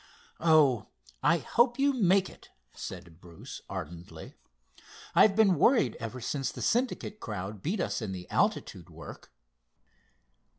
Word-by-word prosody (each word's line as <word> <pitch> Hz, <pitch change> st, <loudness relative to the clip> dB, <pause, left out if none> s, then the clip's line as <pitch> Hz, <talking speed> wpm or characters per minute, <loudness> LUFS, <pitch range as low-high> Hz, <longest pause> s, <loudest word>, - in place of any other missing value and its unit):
"Oh, 150 Hz, -9 st, +4 dB, 0.3 s
I 170 Hz, -, +4 dB
hope 240 Hz, +7 st, +2 dB
you 280 Hz, +1 st, +3 dB
make 195 Hz, -5 st, +3 dB
it!" -, -, -15 dB, 0.2 s
said 85 Hz, -2 st, -9 dB
Bruce 85 Hz, -2 st, -10 dB
ardently. 85 Hz, +3 st, -8 dB, 0.8 s
"I've 200 Hz, -2 st, +5 dB
been 200 Hz, -7 st, +4 dB
worried 230 Hz, -, +4 dB
ever 115 Hz, +3 st, -6 dB
since 135 Hz, +3 st, -2 dB
the -, -, -7 dB
Syndicate 240 Hz, -3 st, -1 dB
crowd 100 Hz, -2 st, -6 dB
beat 185 Hz, -, -2 dB
in 110 Hz, -, -2 dB
the 90 Hz, -1 st, -7 dB
altitude -, -, -1 dB
work." -, -, -11 dB
145 Hz, 125 wpm, -29 LUFS, -, 0.8 s, I've